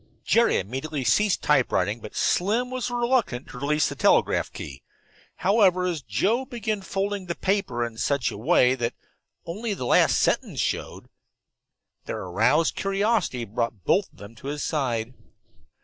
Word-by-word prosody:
Jerry 235 +1 +3
immediately 135 +8 -4
ceased 200 - +2
typewriting, - - +2
but - - -10
Slim 225 +7 +1
was 255 -1 -2
reluctant 240 - 0
to 125 - -9
release 150 +3 +1
the - - -4
telegraph 135 - +2
key. 70 -1 -8 0.5
However, 190 -3 +3
as 170 -5 -2
Joe 190 - 0
began 220 -6 -3
folding 195 0 -3
the 170 - -3
paper 190 - -1
in 115 -1 -8
such 140 -5 0
a - - -7
way 125 +3 +4
that 120 -2 -2 0.5
only 205 +5 -3
the 125 - -5
last - - +4
sentence - - 0
showed, - - -3 1.0
their - - -4
aroused 145 - +2
curiosity 195 - 0
brought 115 -2 -3
both 195 - +1
of - - -25
them 105 +2 -11
to 135 - -9
his 145 +1 -3
side. 125 -6 -1
160 Hz, 150 wpm, -25 LUFS, -, 1.0 s, way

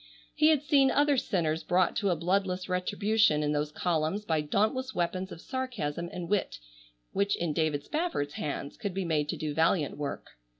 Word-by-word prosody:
He 310 0 +4
had 305 -3 +4
seen 280 -3 +4
other 290 +1 +3
sinners 165 -10 0
brought 180 0 +2
to 200 - +1
a 175 - +2
bloodless 180 +2 0
retribution 200 -2 +2
in 150 - +1
those 150 0 -1
columns 160 +5 -1
by 160 -4 +1
dauntless 220 - 0
weapons 185 +2 -1
of - - -8
sarcasm 190 - -3
and 175 -2 -5
wit 200 - 0 0.5
which 200 +1 +1
in 170 -3 -2
David 150 -2 0
Spafford's 300 - -2
hands 140 -1 -4
could 200 -4 -4
be 190 -1 -1
made 150 -3 0
to - - -2
do 155 -1 -3
valiant 160 -1 +1
work. 145 -1 -5
180 Hz, 180 wpm, -29 LUFS, 155-210 Hz, 0.5 s, He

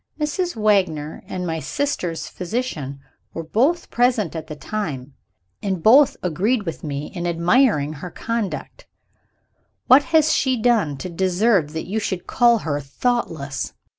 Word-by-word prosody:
Mrs. 345 +4 -1
Wagner 185 -9 +1
and 180 -1 -4
my 160 -1 -2
sister's 180 - -2
physician 175 - -4 0.3
were 165 - -3
both 265 - +1
present 240 -8 +1
at 160 -1 -5
the 155 - -6
time, 145 -8 -5 0.5
and 190 -5 -2
both 265 +5 +6
agreed 205 +7 +1
with 165 -4 -6
me 145 -1 -4
in 175 -1 -3
admiring 170 - +2
her 155 +5 -7
conduct. 230 - -4 1.0
What 265 +3 +6
has 315 -2 +3
she 260 -3 +1
done 220 - +2
to 185 - -5
deserve 185 -1 +1
that 160 - -4
you 210 +4 -2
should 190 -4 -3
call 235 -1 +4
her 145 -2 -1
thoughtless?" 145 - -2
190 Hz, 140 wpm, -22 LUFS, 160-240 Hz, 1.0 s, both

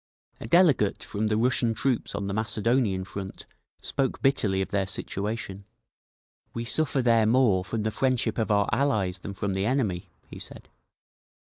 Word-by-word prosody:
A - - -7
delegate 150 - +3
from 105 +1 -2
the 105 0 +1
Russian 120 -1 +2
troops 125 -2 -1
on 100 0 -3
the 100 - -3
Macedonian 110 -2 +1
front 95 0 -8 0.4
spoke 135 -1 -1
bitterly 105 -8 +2
of 95 - -2
their 100 -2 0
situation. 100 0 -4 0.9
"We 115 0 -3
suffer 140 0 +1
there 115 -2 +4
more 110 -6 +3
from 105 +3 -3
the 110 - -1
friendship 125 -2 0
of 110 - 0
our 100 -1 +3
'Allies' 110 -9 +1
than 100 +2 -7
from 100 0 -2
the 95 +2 0
enemy," 110 -9 -1 0.2
he - - -10
said. - - -9
110 Hz, 160 wpm, -26 LUFS, 100-125 Hz, 0.9 s, there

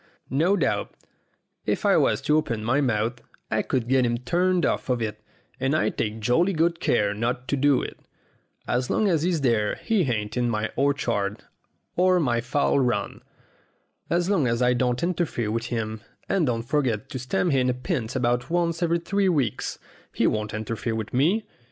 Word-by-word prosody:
No 170 +9 +3
doubt, 155 - -1 0.7
if - - 0
I - - +5
was - - +2
to 150 - +3
open 120 -8 0
my 125 +6 +2
mouth, 120 -2 0 0.3
I - - +2
could 125 -3 -1
get 130 0 +3
him 120 -1 +1
turned 175 +8 +1
off - - -1
of 125 -1 +1
it, 105 -2 -4 0.4
and 135 +3 +1
I - - +2
take 110 0 -3
jolly 165 - +2
good 170 +1 +1
care 105 -3 +1
not 120 +4 -2
to - - +2
do 140 -1 +3
it. - - -7 0.7
As 125 +1 0
long 215 - +2
as 165 -6 +2
he's 170 -2 0
there 115 -5 +1
he 220 -4 0
ain't 105 -2 -2
in 120 -1 +1
my 110 -1 -1
orchard 120 -7 0 0.5
or 185 0 +4
my 120 -7 +1
fowl 140 +3 +1
run. 125 -2 -1 0.9
As 175 +1 +1
long 185 -10 +2
as 115 0 0
I 125 0 +3
don't 125 +1 0
interfere 165 -11 -1
with 115 +2 -2
him, 110 -2 -3 0.3
and 185 -6 +1
don't 115 -2 -1
forget 120 -5 0
to 130 - -5
stand 175 +7 0
him 130 -2 +2
a - - +2
pint 125 - -3
about 125 0 0
once 170 0 0
every 170 0 +2
three 195 +3 0
weeks, 140 - -1 0.4
he - - +1
won't 105 -1 0
interfere 110 +1 -3
with 110 -1 -5
me. 175 - +2
125 Hz, 185 wpm, -25 LUFS, 115-165 Hz, 0.9 s, I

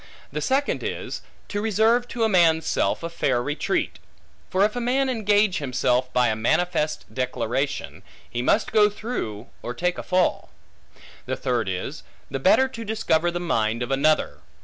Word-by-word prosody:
The 150 +2 -3
second 270 - +1
is, - - -4 0.3
to 205 - -2
reserve 225 +3 +2
to 235 -2 -2
a - - +4
man's 165 -5 +4
self - - 0
a 170 - -3
fair 130 -6 +1
retreat. 145 +4 -1 0.5
For 190 +2 +3
if 215 - -2
a - - -1
man 260 +3 +1
engage 210 -5 +2
himself 125 -2 0
by 125 -2 +3
a 110 - 0
manifest 155 +6 0
declaration, 130 +2 -2 0.3
he 120 - -3
must 205 - +2
go 210 -1 +5
through 135 - -5
or 120 - -5
take 180 +4 -1
a - - -5
fall. 185 -1 +1 0.8
The - - -1
third 120 -5 -1
is, 90 -1 -4 0.3
the 135 - -2
better 260 - +5
to 230 -3 -7
discover 175 -6 +1
the 175 0 -3
mind 115 -9 0
of 120 - -5
another. 150 +3 +2
170 Hz, 170 wpm, -24 LUFS, 125-215 Hz, 0.8 s, go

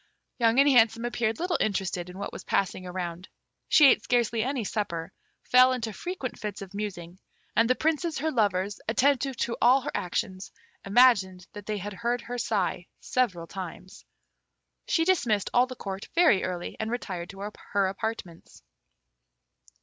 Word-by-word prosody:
Young 230 +1 +4
and 280 - +6
Handsome 230 -3 +4
appeared 235 -2 -1
little 355 -1 0
interested 185 -3 -1
in 180 - -10
what 200 - -5
was - - -8
passing 185 -1 -1
around. 180 0 -5 0.4
She 300 - +7
ate - - +5
scarcely 235 -2 +1
any 260 0 -1
supper, 185 -5 -3 0.3
fell 255 +1 +6
into 230 -4 -3
frequent 350 - -5
fits 205 -2 -5
of 195 0 -12
musing, 185 -4 -6 0.4
and 230 +2 +3
the 255 - +4
princes, 320 +2 0
her 315 +3 -1
lovers, 205 -4 0
attentive 270 +2 +2
to 235 0 -1
all 255 +3 +5
her - - -4
actions, 185 +2 -3 0.3
imagined 195 -5 +4
that 205 -1 -10
they 215 -1 -2
heard 230 +5 -3
her 245 +1 -5
sigh 195 -6 -1
several 200 -10 -1
times. 185 +1 -9 0.8
She 325 - +2
dismissed 240 - +1
all 245 +1 +4
the 255 - -8
Court 195 -3 -6
very 335 - +5
early, 180 -1 -4
and 220 - -2
retired 185 -7 -4
to 200 +1 -7 0.2
her 200 -1 +3
apartments. 190 -3 -5
215 Hz, 155 wpm, -27 LUFS, 190-250 Hz, 0.8 s, She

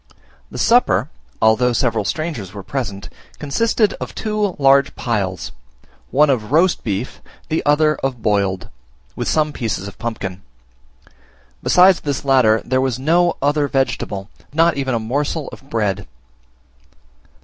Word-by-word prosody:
The - - -9
supper, 240 +2 +3 0.3
although 120 +3 +4
several 115 -3 0
strangers 120 - -4
were 100 - -7
present, 100 -7 -4 0.3
consisted 215 +8 +1
of - - -6
two 210 -3 -1
huge 140 0 +4
piles, 100 -6 -2 0.6
one 150 +3 +4
of 115 -3 -2
roast 170 +4 +3
beef, 105 +3 -4 0.3
the 160 - 0
other 155 +1 +4
of 135 -3 -3
boiled, 100 -3 0 0.5
with - - -3
some 155 -1 +1
pieces 110 -6 -3
of 100 - -11
pumpkin: 100 -5 -5 1.2
besides 180 0 +5
this 140 -2 -3
latter 125 -5 +4
there 130 0 +1
was 130 -3 -1
no 170 +6 +2
other 145 0 +2
vegetable, 130 -7 -2
and - - -23
not 165 0 +4
even 135 -3 -1
a - - 0
morsel 145 +7 -2
of 135 - -14
bread. 105 -6 -1
135 Hz, 140 wpm, -19 LUFS, 110-155 Hz, 1.2 s, besides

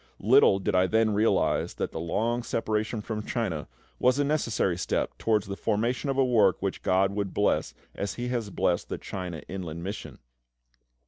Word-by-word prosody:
Little 95 - +6
did 95 - -2
I 90 0 +4
then 110 +1 +2
realise 110 +2 +1
that - - -3
the - - -5
long 115 +9 0
separation 110 -1 -2
from 105 0 -4
China 95 -12 -2 0.3
was 125 +1 +3
a 145 - +2
necessary 130 - 0
step 90 - -1
towards 110 -3 +1
the 100 - -5
formation 115 +7 -1
of 135 - -1
a 135 - +4
work 110 -7 +3
which 95 -1 -3
GOD 95 +1 +2
would 100 -1 -3
bless 105 - +1 0.2
as 100 -3 -4
He 120 0 -3
has 120 -4 -2
blessed 90 -2 0
the - - -3
CHINA 90 -4 -6
INLAND 85 -3 -6
MISSION. 100 +3 -6
105 Hz, 180 wpm, -27 LUFS, 95-115 Hz, 0.3 s, Little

